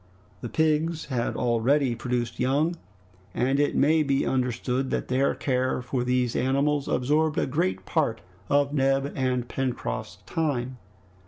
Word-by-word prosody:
The 120 - -5
pigs 160 +2 +1
had 125 -4 -2
already 125 +3 +2
produced 120 0 -3
young, 145 +7 +1 0.6
and 135 +3 +1
it 145 - +1
may 155 +3 +4
be 140 -2 +1
understood 125 +1 -1
that - - -2
their 130 +2 +2
care 130 -1 0
for 125 0 -2
these 125 -1 0
animals 140 +3 +1
absorbed 150 +4 +1
a - - +2
great 170 +7 -1
part 140 -9 0 0.3
of 145 0 +2
Neb 135 0 +1
and 125 -2 0
Pencroft's 130 -1 -3
time. 130 -6 -2
135 Hz, 140 wpm, -26 LUFS, 125-145 Hz, 0.6 s, may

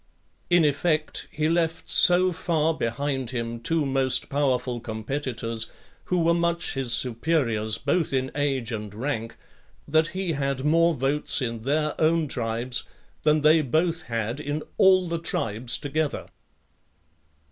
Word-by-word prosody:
In 175 -2 +4
effect, 155 +1 -1
he 155 0 -1
left 165 0 -1
so 180 +1 +6
far 165 -2 0
behind 135 -1 -3
him 115 -2 -4
two 155 +6 0
most 135 -1 +2
powerful 130 -3 0
competitors, 115 0 -4 0.4
who 180 -2 0
were 170 +1 +3
much 170 0 0
his 135 -3 -2
superiors 115 -4 +1
both 175 -3 0
in 130 -1 -1
age 135 -5 -1
and 105 -2 -5
rank, 115 -2 -4 0.5
that 160 +2 +2
he 185 -1 -3
had 135 -2 -2
more 165 +2 +3
votes 140 +3 +1
in 115 -4 -3
their 150 +4 0
own 160 0 +2
tribes, 120 0 -2 0.4
than 150 0 +2
they 155 +2 +5
both 165 +5 0
had 115 -1 -3
in 150 +1 -4 0.2
all 185 -1 +5
the 170 0 -2
tribes 115 -6 0
together. 150 0 -3
145 Hz, 135 wpm, -25 LUFS, 120-160 Hz, 0.5 s, so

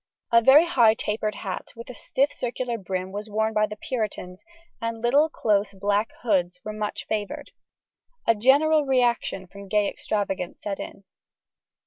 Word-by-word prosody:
A 230 0 +6
very 275 +7 +7
high 240 -10 +4
tapered 215 -1 -2
hat, 190 -3 -6
with 235 +2 -9
stiff 275 +6 0
circular 240 -1 -3
brim, 185 -1 -4
was 205 +2 -6
worn 220 +1 0
by 215 0 +2
the 210 - -7
Puritans, 210 -6 -4 0.4
and 230 0 -3
little, 280 +7 +3
close, 205 -7 0
black 205 +3 0
hoods 180 -6 +1
were 215 - -4
much 210 -1 -4
favoured. 210 -2 -4 0.7
A 230 - +5
general 285 +7 +4
reaction 245 -7 +1
from 200 +2 -12
gay 210 0 +2
extravagance 195 -5 -3
set 200 -2 -4
in. 195 - -8
215 Hz, 150 wpm, -25 LUFS, 200-240 Hz, 0.7 s, very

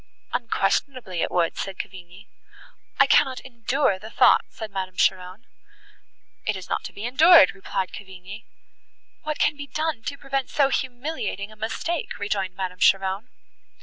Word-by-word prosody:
"Unquestionably 230 -3 -1
it - - 0
would," 170 -2 +1
said 195 -1 -5
Cavigni. 185 0 -9 0.7
"I - - +8
cannot 260 -1 +3
endure 240 -3 0
the 220 - -9
thought," - - +5
said 220 -2 -8
Madame 190 -1 -4
Cheron. 185 +4 0 1.0
"It 215 -2 0
is 185 - -9
not - - -2
to - - -6
be 205 - -7
endured," 300 - +7
replied 190 -1 -4
Cavigni. 190 +2 -10 0.8
"What 305 0 -3
can 295 - +2
be 285 0 -8
done 310 -4 -2
to 280 - -3
prevent 275 -1 -2
so 280 -2 +3
humiliating 245 -6 -3
a - - -13
mistake?" 230 +10 -3
rejoined 195 -2 -2
Madame 185 -1 -4
Cheron. 195 +5 +2
215 Hz, 150 wpm, -24 LUFS, 190-270 Hz, 1.0 s, I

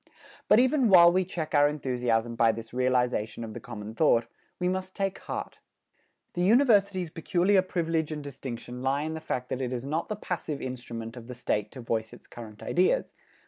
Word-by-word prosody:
But - - +6
even 260 -1 +3
while 170 -3 +8
we 185 +1 +2
check 165 -3 -5
our 145 -1 +6
enthusiasm 125 -5 -1
by 115 -1 +4
this 115 +1 -9
realization 125 -3 0
of 110 -1 -7
the - - -6
common 105 0 -8
thought, 115 -4 +3 0.3
we 180 - -1
must 185 +1 -3
take 195 -1 -2
heart. - - -6 0.7
The 175 - -2
University's 200 - +3
peculiar 180 +4 +2
privilege 165 -4 -1
and 150 -1 -5
distinction 125 -3 -7
lie 135 +2 0
in 160 +1 -3
the 160 - -5
fact 125 -5 -3
that 130 - -3
it 125 -1 -2
is 125 0 -4
not 155 +4 -2
the 215 - -2
passive 170 -7 -4
instrument 120 -2 -6
of 115 -1 -10
the 125 - -7
State 105 -3 -1
to 130 - -8
voice 110 -1 -2
its - - -14
current 110 -3 -11
ideas. 185 - +1
140 Hz, 190 wpm, -28 LUFS, 120-180 Hz, 0.7 s, while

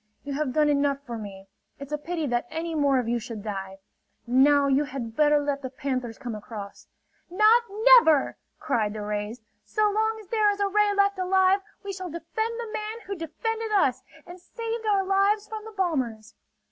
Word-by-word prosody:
"You 280 - -5
have 285 -1 -1
done 300 +1 +3
enough 285 -1 +2
for 240 - -5
me! 200 -3 -8 0.3
It's 280 +1 -10
a 300 - 0
pity 325 +1 -3
that 240 -2 -1
any 330 +1 -4
more 285 -3 +2
of 250 -3 -1
you 240 +1 0
should 220 -2 -7
die. 195 -2 -5 0.5
Now 280 +4 +4
you 280 +1 +2
had 245 -5 -6
better 300 +1 +4
let 285 -1 -1
the 260 - -5
panthers 255 -3 -4
come 245 -4 -6
across." 210 -1 -9 0.4
"Not 430 +6 +5 0.2
never!" 395 - +6 0.2
cried 220 -8 -1
the 215 -1 -5
rays. 210 +2 -4 0.2
"So 425 -1 +1
long 440 +1 0
as 425 - -13
there 430 -2 +3
is 405 0 -1
a 405 - +2
ray 420 +1 +3
left 400 -1 +2
alive, 375 +1 +3 0.2
we 400 0 -5
shall 370 -1 -6
defend 440 +8 -4
the 460 -2 -6
man 435 +2 -4
who 400 - -4
defended 445 +7 -4
us 265 - +2 0.2
and 355 +1 -11
saved 455 +4 -5
our 400 -2 +3
lives 395 +2 +2
from 435 -1 -7
the 445 - -8
bombers." 260 - -2
305 Hz, 195 wpm, -26 LUFS, 250-410 Hz, 0.5 s, never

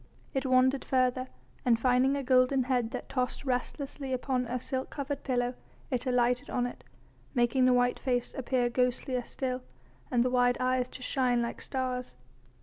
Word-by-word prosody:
It 270 0 -1
wandered 260 +1 +4
further, 255 0 +1 0.4
and 235 -2 +3
finding 255 +3 +3
a 280 - -2
golden 255 +1 +4
head 245 -3 0
that 250 0 -6
tossed 255 +1 -2
restlessly 270 +1 -2
upon 255 -1 -1
a 250 +2 -2
silk 260 +1 -3
covered 280 -1 -4
pillow, 245 -2 0 0.4
it 255 +1 -1
alighted 245 0 +2
on 245 - 0
it, 245 - -7 0.5
making 245 +1 +3
the 255 - +5
white 245 0 +2
face 245 -2 -1
appear 255 -1 +1
ghostlier 250 +1 0
still, 255 +1 -3 0.5
and 240 -2 +3
the 250 - 0
wide 245 -1 +3
eyes 255 0 +1
to 255 - -9
shine 250 -3 +1
like 235 - -4
stars. 255 -1 -3
255 Hz, 165 wpm, -30 LUFS, 245-260 Hz, 0.5 s, the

